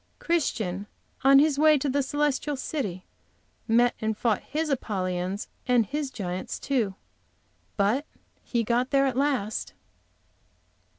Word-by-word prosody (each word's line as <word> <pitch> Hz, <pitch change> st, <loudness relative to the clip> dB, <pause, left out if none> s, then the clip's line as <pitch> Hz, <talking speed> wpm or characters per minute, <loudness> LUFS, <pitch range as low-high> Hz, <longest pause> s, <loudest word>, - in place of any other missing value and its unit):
Christian, 215 Hz, -, -1 dB, 0.4 s
on 270 Hz, +1 st, +7 dB
his 285 Hz, 0 st, +4 dB
way 305 Hz, 0 st, +6 dB
to 285 Hz, -, -2 dB
the 280 Hz, +1 st, +1 dB
celestial 290 Hz, +1 st, 0 dB
city, 210 Hz, -, -4 dB, 0.6 s
met 240 Hz, +1 st, +4 dB
and 220 Hz, -1 st, -1 dB
fought 225 Hz, -4 st, +1 dB
his 310 Hz, +2 st, -2 dB
Apollyons 185 Hz, -5 st, -2 dB, 0.2 s
and 245 Hz, -3 st, +4 dB
his 290 Hz, +6 st, -3 dB
giants, 185 Hz, -6 st, -4 dB
too; 230 Hz, -9 st, -1 dB, 0.8 s
but 220 Hz, +9 st, +1 dB, 0.3 s
he 235 Hz, -2 st, -1 dB
got 240 Hz, +3 st, +1 dB
there 275 Hz, -1 st, +3 dB
at 265 Hz, -3 st, 0 dB
last! 260 Hz, -6 st, -1 dB
250 Hz, 125 wpm, -27 LUFS, 205-280 Hz, 0.8 s, on